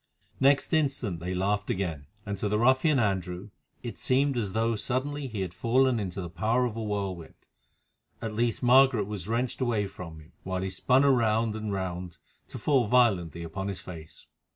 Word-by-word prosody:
Next 140 +4 +3
instant 135 - 0
they 90 +2 -3
laughed 100 +2 0
again, 80 -7 -2 0.2
and 100 -1 -3
to 105 - -1
the 105 - +1
ruffian 130 +6 +4
Andrew 95 -3 -1 0.3
it 120 - -6
seemed 135 +1 +2
as 105 -6 -2
though 115 +1 +1
suddenly 135 +5 -2
he 110 -5 -4
had 90 -2 -4
fallen 125 +5 +2
into 95 -1 -4
the 90 - -5
power 115 +7 +1
of 115 -3 -3
a 115 - -4
whirlwind. 100 -5 -4 0.8
At 110 -1 -4
least 115 +1 0
Margaret 125 -3 +5
was 105 -3 -6
wrenched 120 +4 -1
away 115 -5 +1
from 90 -5 -9
him, 80 +2 -17
while 95 0 -3
he 95 - -3
spun 130 +7 +3
round 115 -4 +2
and 110 -1 -4
round 90 -2 -4 0.3
to - - -8
fall 135 -6 +2
violently 95 -9 +2
upon 95 +4 -5
his 100 -2 -4
face. 80 -3 -11
105 Hz, 180 wpm, -28 LUFS, 95-125 Hz, 0.8 s, Margaret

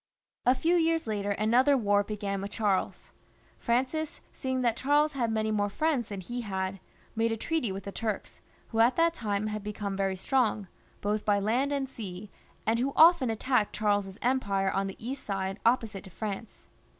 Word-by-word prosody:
A 250 - +6
few 335 +7 +2
years 330 -1 +2
later 205 -2 -2
another 245 +7 +4
war 205 -3 +3
began 200 -2 -3
with 200 - -4
Charles. 205 -3 -1 0.5
Francis, 265 +6 -1
seeing 260 -1 -2
that 235 -2 +2
Charles 295 +4 +2
had 240 -5 0
many 220 0 0
more 205 -1 +1
friends 280 0 0
than 200 -2 -5
he 245 +6 -5
had, 190 -2 -3 0.4
made 225 +1 +1
a 225 - -1
treaty 310 - -1
with 195 0 -5
the 200 - -6
Turks, 215 -1 -4 0.3
who 225 - -2
at 235 +3 +5
that 335 0 +3
time 210 -7 -2
had 215 -1 -3
become 205 -1 -4
very 195 -1 0
strong, 215 -1 +1 0.3
both 210 +1 0
by 205 -1 +3
land 240 +8 +1
and 280 -1 -1
sea, 205 -5 -8 0.3
and 225 +2 +2
who 270 +3 0
often 320 -6 +7
attacked 225 0 +1
Charles's 205 -2 0
empire 200 -7 +1
on 195 0 0
the 195 - -6
east 265 +4 -6
side 195 0 -3
opposite 225 -5 +1
to - - -10
France. 205 +3 -6
220 Hz, 185 wpm, -29 LUFS, 200-260 Hz, 0.5 s, often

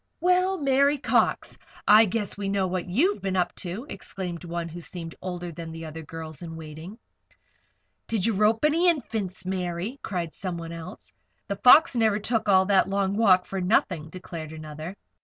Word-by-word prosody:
"Well, 365 +2 +2
Mary 280 0 +3
Cox! 270 - +1 0.3
I 215 +2 +8
guess 210 0 -2
we 200 -1 -3
know 195 -1 +1
what 185 -1 -3
you've 330 - +2
been 195 -1 -2
up 180 -1 +1
to," 195 +7 -5
exclaimed 185 - -6
one 170 -1 -4
who 170 +1 -8
seemed 165 -1 -7
older 175 -1 -5
than 165 0 -7
the 165 0 -7
other 160 +1 -7
girls 160 0 -8
in 165 -2 -7
waiting. 160 +5 -9 1.1
"Did 220 -5 0
you 230 - +2
rope 215 +6 +3
any 330 +4 +4
Infants, 215 - -3
Mary?" 185 +6 -3
cried 175 -5 -3
somebody 170 -3 -5
else. 160 - -9 0.4
"'The 200 - -1
Fox' 275 - +7
never 220 -3 +3
took 220 0 -1
all 190 -1 +5
that 195 -1 +3
long 195 0 0
walk 190 -4 +4
for 195 -1 -4
nothing," 180 -4 +1
declared 165 -3 -8
another. 155 +4 -8
185 Hz, 175 wpm, -26 LUFS, 170-220 Hz, 1.1 s, I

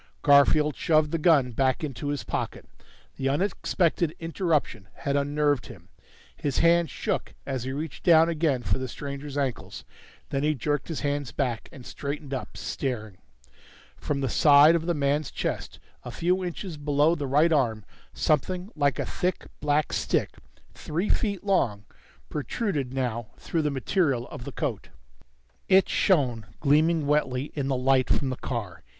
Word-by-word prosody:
Garfield 145 +1 +5
shoved 155 -2 +2
the 165 - 0
gun 150 -6 +4
back 130 +4 0
into 145 -1 -4
his 145 -1 -2
pocket. - - -4 0.5
The 135 - 0
unexpected 170 0 0
interruption 165 - -1
had 140 0 -2
unnerved 145 -1 +1
him; 95 -9 -13 0.5
his 140 -2 -2
hands 170 0 +4
shook - - -3
as 130 -3 -3
he 130 - -3
reached 150 +1 -5
down 165 -2 +6
again 155 -6 0
for 95 +1 0
the 130 - -3
stranger's 140 +2 -6
ankles. 130 - -3 0.5
Then 135 - 0
he 150 +1 +1
jerked 145 +3 -2
his 165 - -4
hands 145 -3 -2
back, 120 -2 -2
and 135 -7 -12
straightened 140 0 -5
up, 130 - -5
staring. 120 -5 -4 0.8
From 140 -2 -3
the 135 - 0
side 145 +4 +6
of 165 0 -1
the 175 - +1
man's 145 0 0
chest, - - -4 0.3
a - - -7
few 180 +2 0
inches 175 -1 -5
below 145 +2 +2
the 145 -5 -3
right 150 +5 +3
arm, 115 -8 +1 0.3
something 180 - 0
like 145 -4 +1
a - - -2
thick 180 +1 -2
black 150 0 +1
stick, - - 0 0.4
three 170 +7 -3
feet 200 -5 0
long, 125 - +1 0.4
protruded 145 - -2
now 120 -4 -2
through 165 - -2
the 150 - 0
material 140 -2 0
of 125 - -8
the 140 - -6
coat. 130 -7 -4 0.8
It 190 0 +6
shone, 125 - +1
gleaming 155 +2 +3
wetly, 140 -2 0
in 140 -3 -2
the 135 - 0
light 130 0 +2
from 135 -2 +1
the - - -2
car. 105 -10 -5
145 Hz, 160 wpm, -26 LUFS, 130-160 Hz, 0.8 s, down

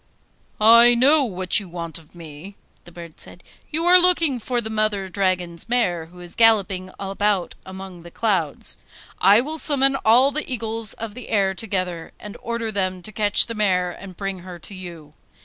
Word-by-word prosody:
'I 235 +2 +6
know 280 +5 +4
what 185 -6 +2
you 195 -3 -10
want 170 -2 -6
of 160 +1 -22
me,' 165 +4 -11 0.3
the 175 - -14
bird 170 -2 -12
said. 175 - -12 0.3
'You 325 +2 -3
are 360 +1 +7
looking 335 -7 +2
for 245 +2 -2
the 220 -1 -6
Mother 215 -3 -1
Dragon's 185 -1 -3
mare 180 -10 0
who 180 +2 -17
is 175 -1 -9
galloping 200 -5 +2
about 195 -1 -1
among 190 -2 -10
the 170 - -12
clouds. 185 -7 0 0.4
I 205 +4 +5
will 310 +4 -3
summon 275 -3 +3
all 250 +4 +3
the 295 -1 -3
eagles 225 -2 -1
of 225 -2 -7
the 250 +1 -10
air 195 -3 +1
together, 185 -5 -4
and 210 -1 -10
order 235 -1 -4
them 185 -3 -3
to 215 - -8
catch 210 -1 +3
the 230 - -6
mare 185 -4 0
and 185 0 -12
bring 195 -2 -5
her 180 0 -10
to 185 - -10
you. 170 -5 -11
200 Hz, 185 wpm, -21 LUFS, 180-230 Hz, 0.4 s, are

